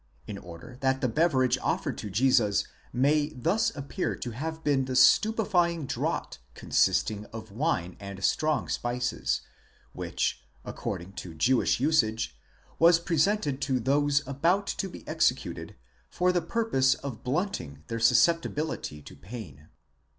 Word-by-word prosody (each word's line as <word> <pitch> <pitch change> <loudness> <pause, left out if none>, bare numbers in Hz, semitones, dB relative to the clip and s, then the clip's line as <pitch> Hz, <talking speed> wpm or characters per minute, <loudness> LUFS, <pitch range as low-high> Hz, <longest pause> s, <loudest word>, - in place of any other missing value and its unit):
4 - - -7
in 100 - -5
order 90 +8 -11
that 135 0 +1
the 130 - +1
beverage 130 -1 +2
offered - - -1
to 105 - -5
Jesus 105 -2 +3 0.3
may 145 +4 +2
thus 180 - +1
appear 145 +6 -3
to 120 - -5
have 160 +7 -5
been 140 -3 +2
the 130 0 -3
stupefying 175 - +4
draught - - -3 0.2
consisting 105 -1 +1
of 110 -1 -9
wine 100 - -1
and 100 -1 -8
strong 155 +6 +1
spices, 125 +1 -1 0.5
which, - - -2 0.2
according 90 +3 -5
to 85 -3 -8
Jewish 125 +11 +2
usage, 115 - +1 0.4
was 165 0 +6
presented 165 -3 +1
to 130 -2 0
those 140 +3 +1
about 170 +9 +1
to 195 - -3
be - - -12
executed, - - -1 0.3
for 180 - +1
the 180 -1 +1
purpose 220 - +2
of 120 -5 -7
blunting 125 - -3
their 115 0 -4
susceptibility 155 - +1
to 70 - -12
pain. 80 - -10
130 Hz, 135 wpm, -28 LUFS, 110-160 Hz, 0.5 s, was